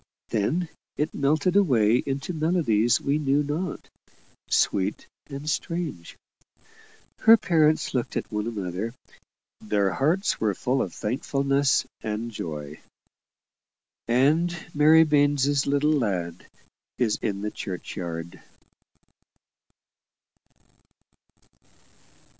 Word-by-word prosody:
Then 145 Hz, -, 0 dB, 0.3 s
it 150 Hz, -, -1 dB
melted 155 Hz, +6 st, +1 dB
away 120 Hz, -, +4 dB
into 135 Hz, +6 st, -3 dB
melodies 155 Hz, -9 st, +2 dB
we 140 Hz, +2 st, 0 dB
knew 145 Hz, 0 st, +1 dB
not 155 Hz, +4 st, -4 dB, 0.6 s
sweet 95 Hz, -2 st, +1 dB, 0.2 s
and 140 Hz, +2 st, -8 dB
strange. 155 Hz, -, -3 dB, 1.0 s
Her 225 Hz, +1 st, +7 dB
parents 155 Hz, -5 st, +2 dB
looked 125 Hz, -3 st, -2 dB
at -, -, -4 dB
one 105 Hz, +1 st, -2 dB
another 105 Hz, +1 st, -4 dB, 0.6 s
their 105 Hz, -2 st, 0 dB
hearts 170 Hz, -, +1 dB
were 105 Hz, -3 st, +1 dB
full 130 Hz, +1 st, 0 dB
of 90 Hz, -, -3 dB
thankfulness 135 Hz, -, 0 dB, 0.2 s
and 110 Hz, +2 st, -4 dB
joy. 75 Hz, -7 st, -6 dB, 1.3 s
"And 155 Hz, +9 st, +2 dB, 0.2 s
Mary 155 Hz, +2 st, +6 dB
Baines's 145 Hz, -2 st, +2 dB
little 145 Hz, +2 st, +2 dB
lad 90 Hz, -, -2 dB, 0.5 s
is 115 Hz, -4 st, +1 dB
in 100 Hz, -2 st, -2 dB
the 105 Hz, 0 st, -3 dB
churchyard." 85 Hz, -3 st, -6 dB
135 Hz, 95 wpm, -25 LUFS, 105-150 Hz, 1.3 s, Her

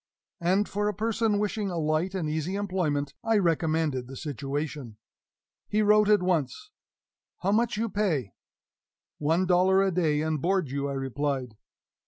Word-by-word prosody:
And, 190 Hz, +4 st, +2 dB
for 205 Hz, +1 st, -1 dB
a 210 Hz, -, -1 dB
person 225 Hz, 0 st, 0 dB
wishing 210 Hz, 0 st, -1 dB
a 175 Hz, -, -3 dB
light 160 Hz, +4 st, 0 dB
and 175 Hz, -5 st, -1 dB
easy 160 Hz, +4 st, -2 dB
employment, 175 Hz, -8 st, -1 dB
I 225 Hz, -1 st, +2 dB
recommended 160 Hz, -7 st, +1 dB
the 135 Hz, -, -9 dB
situation. 140 Hz, -3 st, -4 dB, 0.7 s
He 215 Hz, +1 st, +1 dB
wrote 210 Hz, 0 st, +5 dB
at 210 Hz, -3 st, +4 dB
once, 180 Hz, -, -1 dB, 0.7 s
"How 195 Hz, -, +1 dB
much 225 Hz, +1 st, +1 dB
you 230 Hz, +2 st, 0 dB
pay?" 175 Hz, -, -1 dB, 0.9 s
"One 165 Hz, +5 st, +2 dB
dollar 185 Hz, +2 st, +4 dB
a 195 Hz, -, +1 dB
day, 160 Hz, -4 st, +1 dB
and 155 Hz, -2 st, -1 dB
board 185 Hz, -6 st, 0 dB
you," 140 Hz, 0 st, -2 dB
I -, -, -3 dB
replied. 135 Hz, -2 st, -2 dB
175 Hz, 155 wpm, -27 LUFS, 145-205 Hz, 0.9 s, wrote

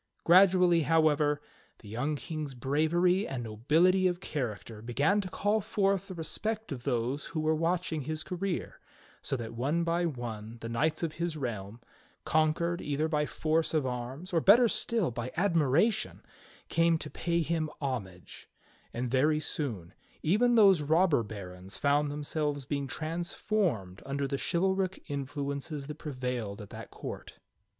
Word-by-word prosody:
Gradually, 180 Hz, -1 st, +6 dB
however, 150 Hz, -2 st, +3 dB, 0.4 s
the 105 Hz, -, -15 dB
young 125 Hz, +8 st, -1 dB
King's 150 Hz, -2 st, -5 dB
bravery 160 Hz, -, +2 dB
and 130 Hz, -3 st, -4 dB
nobility 160 Hz, -, +3 dB
of 175 Hz, -1 st, -1 dB
character 115 Hz, -, -4 dB
began 140 Hz, -, +2 dB
to 185 Hz, -, -6 dB
call 205 Hz, +4 st, +1 dB
forth 195 Hz, -1 st, 0 dB
the 185 Hz, -, -7 dB
respect 215 Hz, +5 st, -3 dB
of 125 Hz, -3 st, -6 dB
those 125 Hz, +2 st, -1 dB
who 160 Hz, -, -4 dB
were 155 Hz, 0 st, +2 dB
watching 165 Hz, 0 st, 0 dB
his 155 Hz, +3 st, -4 dB
career, 185 Hz, 0 st, -3 dB, 0.4 s
so 135 Hz, -, -2 dB
that 115 Hz, -1 st, -6 dB
one 145 Hz, +9 st, 0 dB
by 170 Hz, +1 st, +1 dB
one 115 Hz, -5 st, -6 dB
the 115 Hz, -, -5 dB
knights 150 Hz, +9 st, 0 dB
of 160 Hz, -2 st, -1 dB
his 170 Hz, -1 st, -3 dB
realm, 115 Hz, -4 st, -5 dB, 0.4 s
conquered 160 Hz, +2 st, +1 dB
either 150 Hz, +2 st, 0 dB
by 150 Hz, -2 st, 0 dB
force 160 Hz, +1 st, 0 dB
of 150 Hz, -3 st, +2 dB
arms 130 Hz, +8 st, -5 dB
or 165 Hz, -, +3 dB
better 235 Hz, +7 st, +7 dB
still 225 Hz, -, 0 dB
by 120 Hz, +2 st, -4 dB
admiration, 170 Hz, -, +2 dB, 0.4 s
came 165 Hz, 0 st, +3 dB
to 155 Hz, -1 st, -7 dB
pay 170 Hz, 0 st, 0 dB
him 160 Hz, -1 st, -1 dB
homage; 105 Hz, -, -5 dB, 0.5 s
and 120 Hz, 0 st, -2 dB
very 150 Hz, +4 st, +3 dB
soon 115 Hz, -, -3 dB, 0.3 s
even 235 Hz, +9 st, +3 dB
those 195 Hz, -7 st, +6 dB
robber 160 Hz, -1 st, +3 dB
barons 95 Hz, -3 st, -8 dB
found 145 Hz, +1 st, +2 dB
themselves 145 Hz, -1 st, -2 dB
being 140 Hz, 0 st, -2 dB
transformed 160 Hz, -, -2 dB
under 140 Hz, 0 st, -2 dB
the 140 Hz, 0 st, -2 dB
chivalric 190 Hz, +1 st, 0 dB
influences 140 Hz, +1 st, -4 dB
that 150 Hz, +2 st, -8 dB
prevailed 125 Hz, -8 st, -4 dB
at 105 Hz, -2 st, -10 dB
that -, -, -8 dB
court. -, -, -8 dB
150 Hz, 150 wpm, -30 LUFS, 125-170 Hz, 0.5 s, better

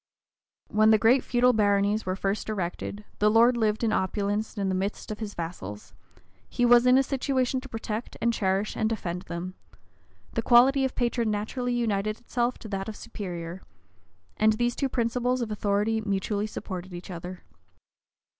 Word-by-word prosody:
When 215 Hz, +1 st, +4 dB
the 220 Hz, -, +7 dB
great 245 Hz, +5 st, +4 dB
feudal 250 Hz, 0 st, +3 dB
baronies 205 Hz, -1 st, +2 dB
were 185 Hz, -, 0 dB
first 195 Hz, +3 st, -2 dB
erected, 200 Hz, +1 st, -4 dB
the 210 Hz, -, +4 dB
lord 230 Hz, +3 st, +5 dB
lived 220 Hz, -1 st, 0 dB
in 220 Hz, -2 st, +2 dB
opulence 205 Hz, +3 st, -1 dB
in 200 Hz, -1 st, 0 dB
the 190 Hz, -, 0 dB
midst 195 Hz, +3 st, -3 dB
of 210 Hz, -, -5 dB
his 210 Hz, -2 st, -5 dB
vassals: 105 Hz, -, -7 dB, 0.6 s
he 245 Hz, -, +1 dB
was 240 Hz, +1 st, +6 dB
in 250 Hz, +1 st, +6 dB
a 270 Hz, -, +4 dB
situation 260 Hz, -1 st, 0 dB
to 270 Hz, -, -11 dB
protect, 225 Hz, 0 st, -5 dB
and 235 Hz, 0 st, +1 dB
cherish 195 Hz, 0 st, 0 dB
and 220 Hz, -, 0 dB
defend 180 Hz, -5 st, -3 dB
them: 175 Hz, +1 st, -5 dB, 0.8 s
the -, -, 0 dB
quality 260 Hz, +3 st, +5 dB
of 265 Hz, -, -3 dB
patron 240 Hz, -2 st, 0 dB
naturally 240 Hz, +4 st, -2 dB
united 215 Hz, -2 st, -1 dB
itself 240 Hz, 0 st, -1 dB
to -, -, -10 dB
that 195 Hz, 0 st, -3 dB
of 215 Hz, -, -6 dB
superior: 175 Hz, -3 st, -6 dB, 0.8 s
and 215 Hz, 0 st, +4 dB
these 240 Hz, +2 st, 0 dB
two 275 Hz, -, -1 dB
principles 245 Hz, +1 st, 0 dB
of 235 Hz, -3 st, -3 dB
authority 210 Hz, +2 st, 0 dB
mutually 205 Hz, +1 st, -1 dB
supported 185 Hz, -3 st, -6 dB
each 175 Hz, +2 st, -8 dB
other. 180 Hz, +1 st, -7 dB
215 Hz, 170 wpm, -27 LUFS, 195-240 Hz, 0.8 s, the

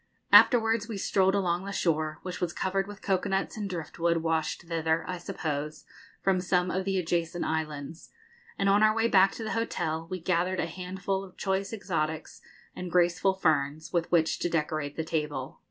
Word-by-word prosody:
Afterwards 225 Hz, -3 st, +6 dB
we 220 Hz, -3 st, -5 dB
strolled 190 Hz, 0 st, +2 dB
along 180 Hz, -2 st, 0 dB
the 200 Hz, -, -4 dB
shore, 155 Hz, -4 st, 0 dB
which 180 Hz, -1 st, -6 dB
was 175 Hz, -1 st, -1 dB
covered 195 Hz, +1 st, -1 dB
with 205 Hz, -1 st, -10 dB
cocoa 195 Hz, 0 st, 0 dB
nuts 195 Hz, 0 st, -1 dB
and 210 Hz, -3 st, -4 dB
driftwood, 170 Hz, -1 st, -1 dB
washed 160 Hz, 0 st, -1 dB
thither, 165 Hz, -1 st, 0 dB
I 180 Hz, -1 st, -4 dB
suppose, 150 Hz, -2 st, -4 dB, 0.4 s
from 190 Hz, -2 st, +2 dB
some 180 Hz, -1 st, +1 dB
of 185 Hz, 0 st, -1 dB
the 195 Hz, -1 st, 0 dB
adjacent 170 Hz, -1 st, -1 dB
islands, 155 Hz, 0 st, -4 dB, 0.5 s
and 195 Hz, -, +1 dB
on 200 Hz, +1 st, +5 dB
our 215 Hz, 0 st, +5 dB
way 225 Hz, 0 st, +2 dB
back 195 Hz, -3 st, +5 dB
to 225 Hz, -, -6 dB
the 220 Hz, -, -3 dB
hotel 165 Hz, -8 st, -2 dB
we 185 Hz, -1 st, -3 dB
gathered 180 Hz, +2 st, 0 dB
a -, -, +1 dB
handful 190 Hz, +3 st, -3 dB
of 185 Hz, -2 st, -13 dB
choice 195 Hz, 0 st, -1 dB
exotics 160 Hz, -7 st, -3 dB, 0.3 s
and 180 Hz, -1 st, -6 dB
graceful 180 Hz, +2 st, +3 dB
ferns, 155 Hz, -2 st, 0 dB
with 170 Hz, -2 st, 0 dB
which 165 Hz, -2 st, +2 dB
to 175 Hz, -, 0 dB
decorate 155 Hz, -3 st, -1 dB
the 160 Hz, -, -2 dB
table. 150 Hz, -5 st, -3 dB
175 Hz, 185 wpm, -28 LUFS, 160-195 Hz, 0.5 s, Afterwards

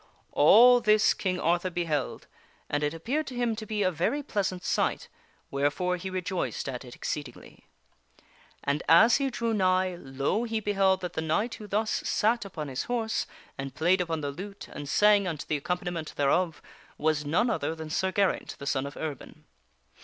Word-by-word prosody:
All 240 Hz, +11 st, +7 dB
this 215 Hz, -1 st, +4 dB
King 185 Hz, -2 st, -2 dB
Arthur 175 Hz, +3 st, +1 dB
beheld, 165 Hz, -6 st, -2 dB, 0.5 s
and 145 Hz, -, 0 dB
it 150 Hz, 0 st, 0 dB
appeared 260 Hz, -, -2 dB
to 255 Hz, -, -6 dB
him 240 Hz, -2 st, 0 dB
to 215 Hz, 0 st, -7 dB
be 210 Hz, -1 st, -1 dB
a 185 Hz, -, +2 dB
very 180 Hz, -, -1 dB
pleas 205 Hz, -8 st, -1 dB
ant 180 Hz, -1 st, -8 dB
sight, -, -, 0 dB, 0.4 s
wherefore 145 Hz, +6 st, 0 dB
he 185 Hz, +2 st, -5 dB
rejoiced 185 Hz, -3 st, -3 dB
at 130 Hz, -2 st, -5 dB
it 125 Hz, -2 st, -11 dB
exceedingly. 145 Hz, -5 st, -7 dB, 1.0 s
And 140 Hz, +1 st, 0 dB
as 220 Hz, +9 st, +7 dB
he 275 Hz, -1 st, 0 dB
drew 230 Hz, -2 st, -2 dB
nigh, 185 Hz, -2 st, +2 dB
lo! 135 Hz, -, -1 dB
he 225 Hz, -2 st, -1 dB
beheld 195 Hz, -2 st, +2 dB
that 180 Hz, -, -5 dB
the -, -, -2 dB
knight 185 Hz, +9 st, 0 dB
who 210 Hz, -, -9 dB
thus 215 Hz, +2 st, 0 dB
sat 230 Hz, +1 st, +1 dB
upon 160 Hz, -6 st, -6 dB
his 130 Hz, -1 st, -3 dB
horse 230 Hz, -2 st, -1 dB, 0.3 s
and 135 Hz, -1 st, -5 dB
played 180 Hz, +4 st, +3 dB
upon 165 Hz, -3 st, -2 dB
the 145 Hz, -1 st, -2 dB
lute 195 Hz, +7 st, -8 dB
and 145 Hz, -1 st, -7 dB
sang 205 Hz, +1 st, +4 dB
unto 155 Hz, -4 st, -4 dB
the 150 Hz, -, -1 dB
accompaniment 175 Hz, +1 st, -4 dB
thereof, 155 Hz, +3 st, +1 dB, 0.3 s
was 155 Hz, -1 st, +1 dB
none 170 Hz, +11 st, +1 dB
other 160 Hz, -6 st, -2 dB
than 160 Hz, -1 st, -7 dB
Sir 190 Hz, +4 st, 0 dB
Geraint, 195 Hz, 0 st, 0 dB
the 140 Hz, -, -8 dB
son 140 Hz, -1 st, 0 dB
of 140 Hz, -, -10 dB
Erbin. 150 Hz, -4 st, -7 dB
180 Hz, 185 wpm, -28 LUFS, 150-210 Hz, 1.0 s, All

